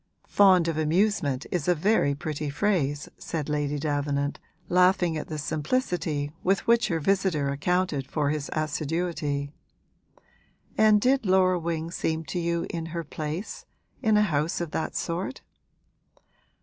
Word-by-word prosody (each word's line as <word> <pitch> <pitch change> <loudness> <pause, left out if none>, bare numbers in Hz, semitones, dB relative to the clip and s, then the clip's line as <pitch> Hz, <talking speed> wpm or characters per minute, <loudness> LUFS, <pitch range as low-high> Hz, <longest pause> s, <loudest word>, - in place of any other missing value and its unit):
'Fond 185 -4 +5
of 160 -1 -1
amusement 155 -4 +1
is 175 -3 -1
a 180 - +4
very 165 -4 +2
pretty 150 0 -4
phrase!' 145 -3 0
said 155 -4 -4
Lady 145 -1 -1
Davenant, 145 -1 -1 0.3
laughing 180 -1 +3
at 155 - -4
the 155 - -5
simplicity 155 - -1
with 195 +1 +1
which 235 0 +4
her 170 -5 0
visitor 175 -4 +1
accounted 150 -1 0
for 145 -2 0
his 150 -2 -3
assiduity. 155 -2 -2 1.2
'And 215 -1 +5
did 260 +3 +2
Laura 185 -1 +4
Wing 165 0 -3
seem 160 -1 -2
to 180 - -1
you 170 0 -1
in 165 -1 -4
her 170 0 -4
place 155 +6 -5 0.3
in 220 -4 +3
a 210 - +5
house 155 -4 0
of 170 -3 -4
that 160 - -3
sort?' 180 +9 -3
165 Hz, 140 wpm, -26 LUFS, 150-185 Hz, 1.2 s, Fond